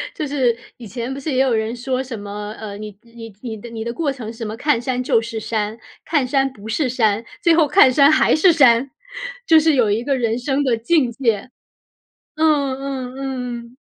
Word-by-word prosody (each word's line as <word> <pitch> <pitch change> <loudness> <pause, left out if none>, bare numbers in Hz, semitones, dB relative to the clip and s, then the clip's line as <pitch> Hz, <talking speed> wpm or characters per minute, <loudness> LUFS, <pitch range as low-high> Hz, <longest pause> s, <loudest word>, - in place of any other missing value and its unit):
就 305 - -3
是 255 -5 +1 0.2
以 235 -3 -10
前 240 +4 -5
不 275 - -6
是 290 +2 -4
也 255 - 0
有 265 -3 +2
人 220 +1 -1
说 255 +1 -2
什 245 -5 -7
么， 205 +1 -6
呃， 205 -2 -7
你 210 -1 -9
你 230 -2 -12
你 225 -3 -5
的 235 +3 -10
你 225 -1 -6
的 235 0 -4
过 300 -2 -1
程 235 -5 -7
什 230 0 -6
么 215 +1 -5
看 265 -3 +1
山 250 0 -2
就 230 -2 +2
是 225 -1 -5
山， 215 0 -3 0.3
看 290 -5 0
山 270 +1 +1
不 215 -4 -12
是 255 +4 0
山， 225 -3 +1 0.2
最 335 -1 +4
后 320 -3 +4
看 275 -6 +6
山 280 +3 +5
还 310 - +4
是 350 +3 +5
山， 265 -4 +4 0.6
就 320 -1 +7
是 310 -1 +3
有 240 -5 +3
一 215 +3 0
个 275 0 0
人 230 -1 0
生 270 +3 -1
的 255 -4 +2
境 250 +1 +2
界。 230 -2 -1 0.9
嗯， 300 -4 +2
嗯， 260 -2 -5
嗯 255 -3 -4
嗯。 245 - -22
250 Hz, 235 characters per minute, -20 LUFS, 225-275 Hz, 0.9 s, 就